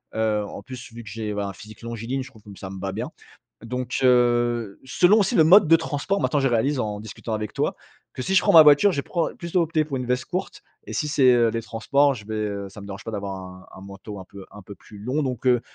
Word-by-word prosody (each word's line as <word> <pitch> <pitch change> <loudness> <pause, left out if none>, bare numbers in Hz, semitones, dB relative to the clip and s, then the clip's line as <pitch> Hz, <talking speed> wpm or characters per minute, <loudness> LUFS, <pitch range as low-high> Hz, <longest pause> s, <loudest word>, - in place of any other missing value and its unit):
heu, 110 -1 +1
en 100 - -8
plus 125 0 -10
vu 120 - -8
que 105 - -10
j'ai, 105 0 -4
voilà, 100 -1 -3
un - - -7
physique 105 +3 -13
longiligne 115 +3 -4
je 130 - -12
trouve 110 -5 -19
que 105 - -14
ça 95 - -7
me 95 0 -8
va 95 +1 -3
bien. 115 +5 -4 0.6
Donc, 125 +1 -3
heu, 120 -3 +2
selon 180 +10 +4
aussi 195 - +1
le 160 - +6
mode 190 +5 +7
de 165 - +8
transport, 165 +6 -2
maintenant 145 - +1
je 135 - +2
réalise 130 +4 +1
en 105 -3 -3
discutant 110 +1 -7
avec 105 -1 -4
toi, - - 0 0.4
que - - -7
si 190 - -1
je 190 - +5
prends - - +3
ma 160 -2 +10
voiture 150 +7 +6
je 140 - -1
prends 170 +1 -1
plutôt 170 +1 -1
opter 160 -1 0
pour 140 -3 -4
une 125 - -4
veste 125 0 -1
courte 185 +1 -5 0.2
et - - -7
si 150 - -1
c'est, 135 -3 +4
heu, 120 -1 +4
les 115 0 -3
transports 140 +6 +1
je 110 -4 -11
vais, 110 - -5
heu, 100 -2 -3
ça 100 - -11
me 100 - -10
dérange 100 +1 -8
pas - - -5
d'avoir 100 -2 -4
un 95 0 -11
un - - -11
manteau 100 +1 -9
un 95 - -9
peu 100 0 -12
un 105 - -11
peu 100 +2 -11
plus 105 - -16
long. 130 +9 -2
Donc, 130 -2 -4
heu, 125 -2 +4
120 Hz, 270 wpm, -24 LUFS, 105-140 Hz, 0.6 s, ma